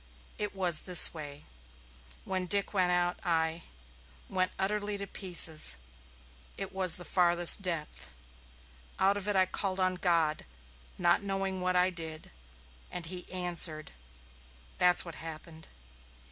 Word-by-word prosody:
It 210 -1 -4
was 175 -5 0
this 180 - +7
way. 145 -3 -10 0.8
When 185 -1 -4
Dick 200 +4 +2
went 185 -3 +1
out 175 0 -1
I 165 0 -1 0.7
went 185 0 -1
utterly 205 +1 -2
to 200 - -6
pieces. 165 - +2 0.8
It - - -7
was 185 -3 +5
the 175 - -7
farthest 175 +1 +3
depth. 155 - -5 0.9
Out 195 +1 +2
of 205 0 -6
it 205 - -1
I 190 -1 +3
called 190 0 -3
on 185 0 +1
God, 170 -4 0 0.5
not - - +2
knowing 195 -1 -4
what 185 0 -1
I 180 +1 +2
did. 160 -3 -8 0.6
And 175 -2 -6
he 180 +2 -6
answered. 175 -4 +2 0.9
That's 180 0 +6
what 170 - -9
happened. 160 0 -10
180 Hz, 130 wpm, -29 LUFS, 165-190 Hz, 0.9 s, this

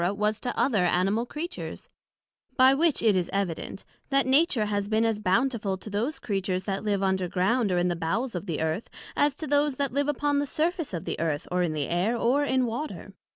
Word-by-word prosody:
was 210 +1 0
to 245 - -3
other 220 -9 +3
Animal 195 +7 +1
Creatures: 330 +7 -6 0.7
By 260 +1 +7
which 310 -1 +2
it 215 -3 +4
is 180 -2 0
evident, 195 -1 -3 0.2
That 275 -1 +3
Nature 265 -3 +3
has 205 -1 -1
been 220 +2 +2
as 225 -2 0
bountiful 210 0 +1
to 205 +3 -10
those 235 +9 -1
Creatures 195 -6 -2
that 195 +1 -3
live 200 -2 0
underground, 190 +4 +1
or 180 - +1
in 175 0 +2
the 175 - 0
bowels 200 +10 -2
of 180 +2 -5
the 165 -3 -2
Earth, 160 +6 -2 0.3
as 290 -2 +2
to 315 - -5
those 290 -1 +2
that 280 -2 -1
live 285 +1 +1
upon 290 0 +1
the 285 - -1
surface 325 - -1
of 165 - -5
the - - -3
Earth, 155 -3 -1
or 180 0 +1
in 170 -3 0
the 150 -3 -2
Air, 185 +8 0
or 255 +5 +2
in 260 -2 +2
Water. 245 +7 -5
215 Hz, 210 wpm, -27 LUFS, 185-270 Hz, 0.7 s, By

